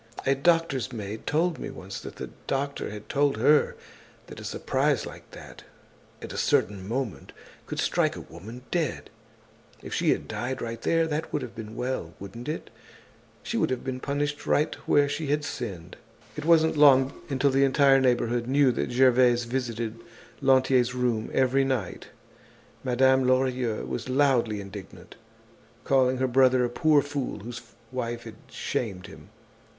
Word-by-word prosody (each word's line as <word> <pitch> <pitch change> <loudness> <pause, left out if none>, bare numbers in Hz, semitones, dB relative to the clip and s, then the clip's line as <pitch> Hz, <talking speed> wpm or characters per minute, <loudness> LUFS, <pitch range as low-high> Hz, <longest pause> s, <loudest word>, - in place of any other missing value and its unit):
A 135 - +4
doctor's 140 -3 +1
maid 110 -2 -6
told 165 +2 +1
me - - -5
once 95 +1 -8
that - - -9
the - - -7 0.2
doctor 140 +1 -2
had 105 0 -9
told 140 -3 +1
her 145 +6 +4 0.5
that - - -11
a - - -9
surprise - - 0
like - - -11
that, - - -12 0.6
at - - -7
a - - -3
certain 95 -1 +1
moment, 120 -1 -4 0.3
could - - -5
strike - - +1
a - - -7
woman 110 +9 -11
dead. 165 -5 -2 0.7
If - - -7
she - - +1
had - - +1
died 130 +2 -3
right 115 0 -5
there, 165 0 +2
that 155 0 -3
would 150 - -1
have 120 - -7
been 110 -1 -8
well, 125 -10 -3
wouldn't 115 +7 -8
it? 155 - -5 0.7
She - - -3
would - - +2
have 130 - -2
been 130 -1 -4
punished 145 +2 -2
right 150 - +2
where 145 -1 +4
she 145 +2 -3
had 145 +1 0
sinned." 95 -12 -6 0.4
It 150 - -5
wasn't 160 -1 +4
long 135 -2 +6 0.2
until 135 0 +2
the 135 +1 +3
entire 135 0 +5
neighborhood 120 -2 +1
knew 135 0 +4
that 120 - -2
Gervaise 125 -1 +4
visited 115 -2 -3 0.4
Lantier's 130 -2 +3
room 120 -3 0
every 135 +1 +3
night. 130 -9 -2 0.8
Madame 130 +1 +3
Lorilleux 130 -3 +1
was 120 - -5
loudly 125 -6 +2
indignant, 100 -1 -11 0.7
calling 130 -1 +3
her 130 - +1
brother 130 0 +4
a - - -2
poor 150 +2 +3
fool 145 -7 -4
whose 120 +3 -7 0.3
wife 120 -2 -3
had 110 -2 -10
shamed 95 -6 -3
him. 100 - -13
130 Hz, 160 wpm, -27 LUFS, 115-140 Hz, 0.8 s, long